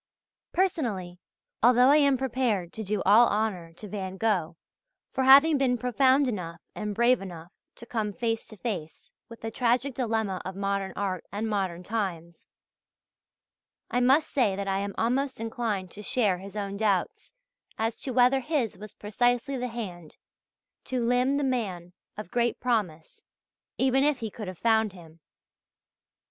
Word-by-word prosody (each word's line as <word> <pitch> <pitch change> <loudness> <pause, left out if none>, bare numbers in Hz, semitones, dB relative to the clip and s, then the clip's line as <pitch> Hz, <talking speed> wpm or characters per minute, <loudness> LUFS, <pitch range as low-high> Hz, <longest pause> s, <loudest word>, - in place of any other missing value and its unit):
Personally, 225 - -1 0.4
although 245 +2 +6
I 290 - +7
am 280 -3 +4
prepared 240 -8 -1
to 220 - -6
do 205 0 -2
all 220 +5 +7
honour 200 -6 -1
to 210 +5 -10
Van 190 -2 -5
Gogh 180 -7 0 0.5
for 260 -1 0
having 280 +3 +7
been 250 -2 +2
profound 260 +3 +3
enough 175 -8 -4
and 210 -1 -4
brave 240 +1 +3
enough 175 -3 -9 0.2
to 235 - -11
come 220 -3 -2
face 225 +1 -2
to 215 - -13
face 185 -9 -5 0.2
with 230 - -12
the 225 - -4
tragic 250 +3 +1
dilemma 220 -6 -1
of 190 0 -6
modern 195 -1 -2
art 190 -3 -2
and 210 +3 -2
modern 190 -5 -2
times, 180 -5 -4 1.4
I 245 - +2
must 270 +5 +3
say 230 -8 +2
that 200 0 -4
I 195 0 0
am 200 0 -4
almost 260 +3 0
inclined 225 -5 -3
to 210 - -10
share 205 -4 +1
his 195 +2 -10
own 200 -1 -3
doubts 200 -4 -1 0.5
as 225 +1 -2
to 265 - -4
whether 250 +2 +4
his 250 - -2
was 210 -1 -10
precisely 245 +6 0
the 250 -1 -2
hand 185 -9 -7 0.7
to 255 - -2
limn 250 +3 +2
the 290 - 0
man 195 -10 -2 0.2
of 210 -3 -7
great 240 -1 0
promise 200 -11 -2 0.5
even 265 +1 +3
if 295 -1 +2
he 225 -3 -5
could 215 -1 -7
have 185 -1 -7
found 220 -2 +2
him. 165 -3 -15
220 Hz, 160 wpm, -27 LUFS, 195-250 Hz, 1.4 s, I